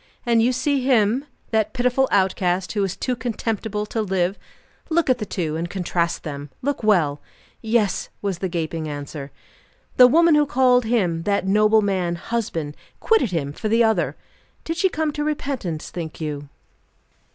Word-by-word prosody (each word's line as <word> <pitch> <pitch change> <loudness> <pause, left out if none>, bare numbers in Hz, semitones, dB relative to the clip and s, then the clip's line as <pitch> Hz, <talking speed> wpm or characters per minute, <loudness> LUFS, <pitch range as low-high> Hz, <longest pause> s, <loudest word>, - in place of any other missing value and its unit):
"And 235 -1 +3
you 240 +3 +3
see 265 +2 0
him, 250 +1 +2 0.3
that 220 -2 +1
pitiful 250 +1 +2
outcast, 185 -2 +1
who 205 -2 0
is 195 -1 -2
too 255 - -1
contemptible 220 -3 -3
to 220 +1 -2
live? 190 -2 0 0.5
Look 325 -4 +2
at 250 - +1
the 210 - -4
two, 160 -5 -2
and 170 +2 -3
contrast 175 -2 -1
them. 145 -1 -6
Look 285 +1 -1
well." 170 -10 +2 0.4
"Yes!" 220 -4 0
was 195 -4 -3
the 190 - -2
gaping 165 -2 -3
answer. 145 -1 -6 0.7
"The 250 - +9
woman 335 +5 +5
who 295 -1 +4
called 250 -2 +3
him, 190 -8 +1
that 200 -2 +1
noble 215 +2 +4
man, 185 -4 0
husband, 170 -7 -3 0.2
quitted 445 - +3
him 145 -5 -2
for 215 +7 -3
the 230 +2 +4
other! 220 -1 +1 0.5
Did 330 0 -3
she 380 +2 +3
come 315 -3 -1
to 295 0 -3
repentance, 275 - -3
think 165 -3 -6
you?" 145 -2 -5
210 Hz, 165 wpm, -22 LUFS, 170-250 Hz, 0.7 s, The